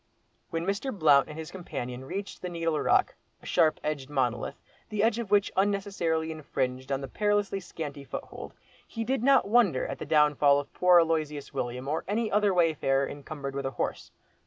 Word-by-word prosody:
When 165 0 -3
Mr. 200 +8 -1
Blount 155 - +4
and 150 - -8
his 160 -1 -7
companion 130 -8 -6
reached 200 +8 -6
the 180 - -4
Needle 165 -3 -1
Rock, - - +2 0.3
a - - -18
sharp 155 -1 +2
edged 145 -3 -3
monolith, 130 -4 -1 0.3
the 210 -2 0
edge 225 +1 +2
of 230 -4 -4
which 205 -1 +3
unnecessarily 190 -5 0
infringed 130 -4 -3
on 135 0 0
the 135 - -5
perilously 205 +3 0
scanty 150 -6 -7
foothold, - - -8 0.3
he 225 - -4
did 260 +1 -1
not 270 -3 +4
wonder 205 - +3
at - - -5
the - - -6
downfall 150 -2 +4
of 145 - -8
poor 180 -1 +5
Aloysius 155 -3 -1
William 125 0 -4
or 155 +3 -1
any 215 +2 -1
other 210 0 +3
wayfarer 150 -6 +2
encumbered 140 -1 -7
with 140 -1 -2
a 130 -3 -7
horse. - - -3
160 Hz, 185 wpm, -28 LUFS, 140-200 Hz, 0.3 s, poor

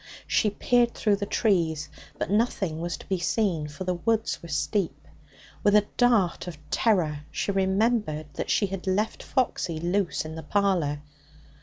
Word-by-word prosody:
She 215 - +2
peered 240 +3 +2
through 210 -2 +2
the 200 0 -3
trees, 165 -10 +1 0.3
but - - -3
nothing 200 -7 0
was 175 0 -3
to - - -13
be 190 -2 -1
seen, 175 -4 0
for 150 +6 -7
the 180 0 0
woods 225 +5 0
were 170 - -10
steep. 160 -1 -1 0.6
With 205 0 +4
a 210 -1 +5
dart 225 -9 +2
of 170 -3 -6
terror 175 -10 +2
she - - -2
remembered 195 -4 +1
that - - -4
she 205 - +3
had 195 0 -5
left 205 +4 0
Foxy 185 - -1
loose 175 0 0
in 155 - -6
the 160 - -6
parlour. 160 -4 0
190 Hz, 165 wpm, -26 LUFS, 165-210 Hz, 0.6 s, a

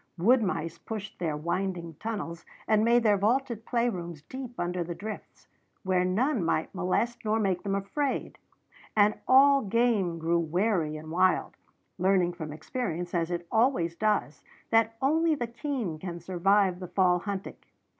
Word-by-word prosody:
Wood 235 +9 +4
mice 170 -4 -2
pushed 215 -2 -7
their 160 -4 -1
winding 170 +1 -2
tunnels 200 -7 -4 0.2
and 215 -1 +3
made 235 +1 +4
their 205 -3 +4
vaulted 235 +1 0
play 240 -1 +1
rooms 170 -8 -5
deep 255 +5 -8
under 175 0 -1
the 170 0 -6
drifts, 215 +3 -8 0.4
where 185 -2 +2
none 220 - +1
might 160 -1 0
molest 190 +6 -1
nor 220 0 +1
make 190 -4 0
them 195 -1 -1
afraid; 260 +8 -2 0.6
and 210 0 +5
all 275 +1 +6
game 210 -5 +1
grew 165 +1 +1
wary 170 -1 0
and 155 +1 -9
wild, 185 +2 +2 0.4
learning 185 -1 +3
from 160 -3 -6
experience, 175 - -4
as 170 -1 0
it 175 -1 -3
always 220 -8 +2
does, 210 -7 0 0.3
that 225 0 +3
only 320 +3 +3
the 245 - -2
keen 235 - -4
can 175 0 -6
survive 185 +2 +2
the 180 - -6
fall 180 0 +3
hunting. 195 +1 -5
195 Hz, 155 wpm, -28 LUFS, 175-230 Hz, 0.6 s, all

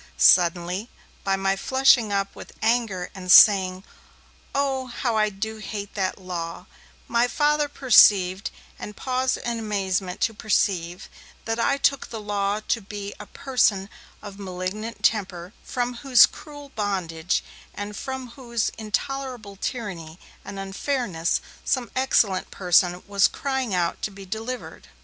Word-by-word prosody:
Suddenly 180 +4 +4 0.3
by 195 -1 +1
my 195 0 0
flushing 260 0 +3
up 195 0 -1
with - - -11
anger 220 -6 0
and 185 -1 -3
saying, 190 -2 +7 0.7
'Oh 270 -2 0
how 240 -1 -2
I 215 -1 +3
do 220 +2 -5
hate 205 -1 -6
that 190 -2 -1
Law,' 175 -3 -6 0.4
my 235 +1 +2
Father 295 +2 +1
perceived, 200 -8 +5 0.3
and 210 - -7
paused 255 0 0
in 235 -1 -3
amazement 190 -4 -2
to 225 - +1
perceive, 185 -5 -1 0.4
that 225 +1 -2
I 275 +4 +2
took 275 -1 +1
the 225 - -6
Law 205 0 -1
to 230 - 0
be 205 0 -7
a - - -9
person 210 -7 0 0.3
of 205 -1 -9
malignant 195 +4 -5
temper 185 -3 0
from 245 -1 -3
whose 255 -3 +7
cruel 290 -2 -11
bondage, 185 - -2 0.3
and 205 +1 -6
from 265 +2 -5
whose 235 -2 -2
intolerable 240 -1 -4
tyranny 190 -8 -5 0.3
and 200 0 -8
unfairness, 195 - -1 0.2
some 250 -3 -1
excellent 225 -7 +2
person 180 -1 +2
was 200 -1 +3
crying 265 -7 -2
out 170 -1 -1
to - - -2
be 195 -1 -11
delivered. 225 +6 -6
210 Hz, 135 wpm, -24 LUFS, 190-245 Hz, 0.7 s, saying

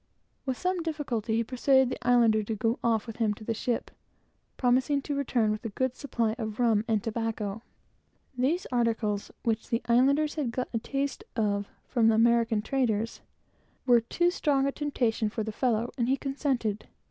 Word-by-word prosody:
With 260 -1 -1
some 365 -1 -1
difficulty, 265 -9 -2
he 230 - +2
persuaded 260 +2 +3
the 255 - -5
islander 230 -3 +5
to 215 +1 -3
go 225 +3 0
off 225 -2 +1
with 225 -2 -8
him 220 -3 +1
to 215 - -12
the 230 - -1
ship, 235 +2 -2 0.7
promising 260 +3 +2
to 290 - -3
return 245 -6 +1
with 215 - -4
a 225 - -3
good 260 +4 -1
supply 235 -6 -1
of 220 -1 -4
rum 225 -4 +3
and 220 -3 +1
tobacco. 225 -2 -3 0.7
These 290 +9 0
articles, 225 -4 0
which 225 -1 -1
the 230 -1 0
islanders 280 +6 +3
had 295 -6 -2
got 250 +2 -3
a 230 - +1
taste 275 +3 -3
of 205 -2 0 0.2
from 225 -3 +3
American 230 -1 +3
traders, 230 -3 -1 0.6
were 240 -2 +5
too 345 +9 +1
strong 280 -6 +1
a 275 - +1
temptation 240 -7 0
for 220 +1 -3
the 220 - -4
fellow, 235 0 0
and 240 +1 +1
he 270 - +3
consented. 265 -7 -2
235 Hz, 175 wpm, -28 LUFS, 220-265 Hz, 0.7 s, islander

